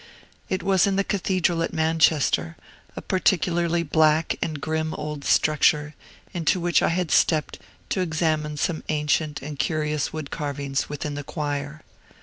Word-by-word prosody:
It 185 - -2
was 195 -1 +3
in 195 - +1
the 195 - +2
Cathedral 185 -4 0
at 165 - -2
Manchester, 160 - +2 0.4
a - - -7
particularly 175 -2 +1
black 155 0 +2
and 155 -2 -2
grim 160 +1 -2
old 150 -1 -5
structure, 150 0 +2 0.4
into 175 +1 +1
which 175 0 +2
I - - +2
had 170 -1 -1
stepped 155 -3 +2 0.3
to 190 - 0
examine 155 -3 -1
some 155 +2 -1
ancient 150 -1 0
and 145 -1 -7
curious 150 -2 -1
wood 155 -3 -6
carvings 140 -2 -3
within 145 0 -4
the 145 0 -5
choir. 145 0 -4
155 Hz, 145 wpm, -24 LUFS, 150-170 Hz, 0.4 s, was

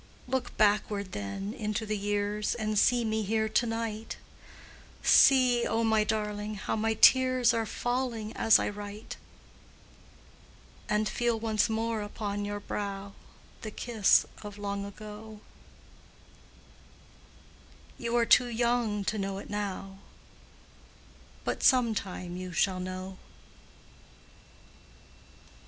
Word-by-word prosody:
Look 260 0 -3
backward, 205 -2 +2
then, 105 - -5
into 215 -3 -3
the 215 0 -2
years, 205 +1 -1
And 215 -2 0
see 240 +1 +3
me 220 0 0
here 220 +1 0
to 220 +2 +1
night 225 -1 -4 0.9
See, 250 -3 +5
O 225 +1 0
my 220 -1 +3
darling! 210 0 -2
how 200 - -3
my 220 0 0
tears 255 0 +5
Are 225 -1 -1
falling 245 -2 -2
as 225 - +5
I - - -1
write; 205 +1 -7 1.7
And 210 0 +1
feel 235 -1 0
once 220 -1 +1
more 225 0 -1
upon 205 0 -4
your 205 0 -4
brow 200 -1 -5 0.5
The 215 - -5
kiss 220 -1 +3 0.2
of 205 -1 -9
long 200 -1 -3
ago 210 +1 -10 2.6
You 235 -1 -2
are 235 - +3
too 245 +1 +5
young 235 -3 0
to 215 +2 -2
know 195 0 -3
it 200 - -9
now, 195 -1 -4 1.4
But - - -2
some 250 -4 +4
time 180 -3 -5
you 185 0 -6
shall 185 +2 +1
know. 185 +1 -6
215 Hz, 115 wpm, -29 LUFS, 205-225 Hz, 2.6 s, See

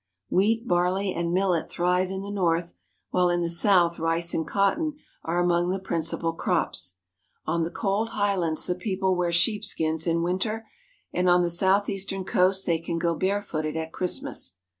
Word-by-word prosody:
Wheat, 225 +5 +2
barley, 180 +2 +1
and 170 0 -2
millet 180 -2 +1
thrive 180 +1 +1
in 190 0 -4
the 200 - -6
north, 170 -3 0 0.4
while 180 -1 +3
in 175 0 +1
the 170 -1 -1
south 170 -1 +4
rice 165 +1 0
and 160 - -1
cotton 295 +11 +1 0.3
are 170 +2 -1
among 175 0 +2
the 190 - 0
principal 165 -3 -2
crops. 165 - -2 0.5
On 165 +2 0
the 165 - -1
cold 210 +4 -1
highlands 195 -7 0
the 180 - 0
people 190 0 -1
wear 175 -1 0
sheepskins 170 -3 0
in 170 0 +1
winter, 215 +6 -2 0.5
and 180 0 +2
on 175 0 +5
the 170 - 0
southeastern 195 +1 +1
coast 190 +2 +2
they 165 -2 +1
can 165 +1 -3
go 170 0 +1
barefooted 165 -4 -2
at 160 0 -4
Christmas. 180 - -2
180 Hz, 165 wpm, -26 LUFS, 170-195 Hz, 0.5 s, on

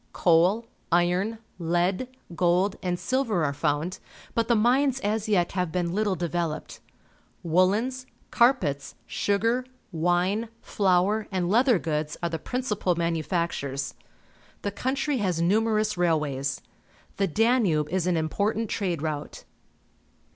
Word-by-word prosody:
Coal, 180 +7 +3 0.3
iron, 180 +6 +2 0.2
lead, 175 +7 0 0.3
gold, 180 +3 +2
and 180 -1 -1
silver 230 -7 0
are 140 - -1
found, 150 +6 -1 0.3
but 230 -1 0
the 235 - +3
mines 255 +4 +3
as 215 +1 -1
yet 180 -5 +2
have 180 -3 -1
been 175 -1 -1
httle 200 0 0
devel 170 -2 -1
oped. - - -13 0.7
Woollens, 210 +10 +1 0.2
carpets, 235 - +2
sugar, 230 +5 0 0.3
wine, 180 +6 +1
flour, 200 +2 +1
and 180 -2 -1
leather 240 +1 +4
goods 150 -2 -2
are 170 - +1
the 165 -1 -3
principal 210 - -1
manu 170 -1 0
factures. 140 -6 -2 0.7
The 200 - -1
country 270 +6 -1
has 185 -7 0
numerous 215 +4 +2
railways. 150 -5 0 0.5
The 195 - +2
Danube 210 - +2
is 185 -1 0
an 175 -2 +2
important 205 +7 -1
trade 175 -7 -1
route. 150 -2 -4
185 Hz, 125 wpm, -26 LUFS, 170-220 Hz, 0.7 s, leather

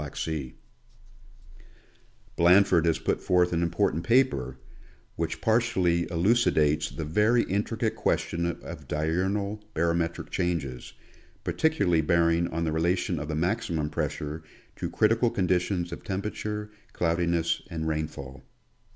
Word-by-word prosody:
Black 75 -2 -7
Sea, 75 -6 -3 1.8
Blanf 90 +4 +5
ord 85 -1 +4
has 80 -1 +2
put - - -1
forth 90 -1 +2
an 85 - +1
important 85 -1 0
papei% 115 - +2 0.6
which 80 -1 -3
partially 95 -6 +2
elu 85 +5 +2
cidates 75 -10 +2
the 80 - -4
very 105 +9 +3
intricate 110 +3 -1
question 85 -5 0
of 85 - -7
diurnal 95 +7 -1
barometric 85 +1 -1
changes, 85 -9 -2 0.5
particularly 100 - +2
bearing 85 +1 +2
on 85 +1 -3
the 80 - 0
relation 85 +2 0
of 75 - -5
the 75 - -3
maximum 85 -3 -1
pressure 75 0 -3 0.3
to - - -4
critical 115 +2 +3
conditions 90 -2 0
of - - -7
temperature, 105 +2 -4 0.2
cloudiness 85 0 0
and 80 -1 -3
rainfall. 75 -4 -4
85 Hz, 125 wpm, -27 LUFS, 80-100 Hz, 1.8 s, Blanf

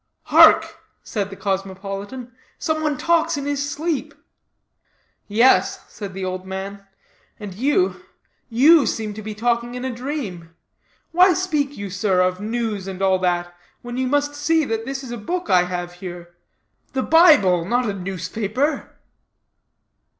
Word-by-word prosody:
"Hark!" - - +7 0.3
said 205 -3 -3
the 195 - -9
cosmopolitan. 195 +5 -4 0.3
"Some 315 -1 -1
one 300 -3 0
talks 330 -1 +1
in 280 - -4
his 285 0 -2
sleep." 310 0 -3 1.1
"Yes," 230 +5 +3
said 200 -3 -7
the 190 -1 -4
old 185 0 -4
man, 195 +1 -7 0.5
"and 205 -3 -7
you 290 - +1 0.5
you 275 +4 +5
seem 215 -1 -2
to 215 - -8
be 215 0 -6
talking 235 +2 -1
in 250 +1 -5
a 260 - -3
dream. 230 - -6 0.6
Why 360 +1 +5
speak 300 -6 -1
you, 200 -1 -6
sir, 195 -1 +1
of 185 0 +1
news, 220 -3 -3
and 190 -1 -6
all 190 -1 +2
that, 175 -1 -1 0.3
when 240 0 -6
you 260 0 -1
must 290 +2 0
see 310 +2 +1
this 250 +4 -3
is 250 - -8
a 240 - -4
book 350 - -3
I 180 -1 +5
have 175 -1 -5
here 175 -1 -9 0.6
the 260 -1 0
Bible, 295 - +5
not 240 +7 0
a 205 - -1
newspaper?" 195 - -3
220 Hz, 150 wpm, -21 LUFS, 190-285 Hz, 1.1 s, Hark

